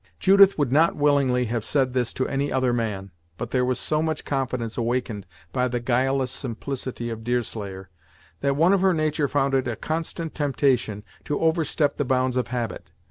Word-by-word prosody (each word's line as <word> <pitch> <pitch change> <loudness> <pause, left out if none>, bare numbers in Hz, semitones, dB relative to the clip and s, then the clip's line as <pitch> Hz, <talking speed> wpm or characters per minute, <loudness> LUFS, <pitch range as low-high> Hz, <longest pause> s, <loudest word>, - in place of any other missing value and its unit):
Judith 195 0 +6
would 145 -5 0
not 155 +5 +4
willingly 140 -4 +2
have 115 -1 -2
said 130 +1 +1
this 125 -2 0
to 130 - -2
any 140 +1 -1
other 130 -2 +1
man, 105 -5 -3 0.3
but - - -5
there 125 -1 +2
was 125 0 0
so 155 0 0
much 160 -1 -2
confidence 130 -5 -2
awakened 115 -4 -2 0.3
by 125 -1 +1
the 120 0 -2
guileless 130 +2 +1
simplicity 125 -1 -4
of 110 0 -6
Deerslayer, 105 -5 -3 0.5
that 140 0 +1
one 170 +6 +4
of 195 - +2
her 190 -2 +3
nature 155 -2 +1
found 140 -1 0
it 130 -1 +1
a 120 - -2
constant 160 - -4
temptation 130 -7 0 0.2
to 145 - -2
overstep 160 -3 +1
the - - +1
bounds 130 0 +1
of 125 - 0
habit. 120 -2 -4
130 Hz, 185 wpm, -24 LUFS, 120-145 Hz, 0.5 s, Judith